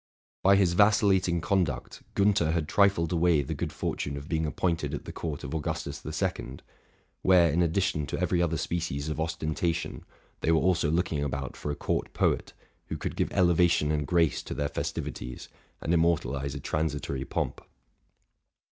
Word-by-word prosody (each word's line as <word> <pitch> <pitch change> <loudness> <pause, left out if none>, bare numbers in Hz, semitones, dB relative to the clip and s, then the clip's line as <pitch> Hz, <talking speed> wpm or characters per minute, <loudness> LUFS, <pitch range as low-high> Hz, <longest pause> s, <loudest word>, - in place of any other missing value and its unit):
By 100 +1 +6
his 95 -3 +3
vacillating 95 -3 +4
conduct, 85 -6 -1
Giinther 100 -6 +3
had 80 -3 0
trifled 95 -3 +3
away 85 -3 +3
the 75 +4 -4
good 70 - -3
fortune 70 0 -3
of 70 +1 -8
being 80 -3 0
appointed 85 +2 -1
at - - -7
the - - -6
court 75 -4 -5
of 70 - -5
Augustus 80 -2 -3
the - - -7
Second, 65 +2 -3 0.6
where, 90 -3 +5
in 85 +4 +2
addition 85 -3 +1
to - - -3
every 85 - +1
other 85 -2 +1
species 80 -3 -2
of 75 0 -3
osten 80 -1 -2
tation, 85 0 -2 0.4
they 80 - +1
were 80 - +4
also 85 -4 +2
looking 80 -3 0
about 70 -2 -3
for - - -5
a 75 - -1
court - - -2
poet, - - 0 0.3
who - - -4
could - - -4
give - - -1
elevation 85 -4 +3
and 75 -2 -1
grace 85 -1 +2
to - - -6
their 70 0 -1
festivities, 60 -3 -5 0.3
and 80 - 0
im 85 - +4
mortalize 70 -5 0
a - - -4
transitory 75 -2 -2
pomp. - - -3
80 Hz, 175 wpm, -28 LUFS, 75-85 Hz, 0.6 s, By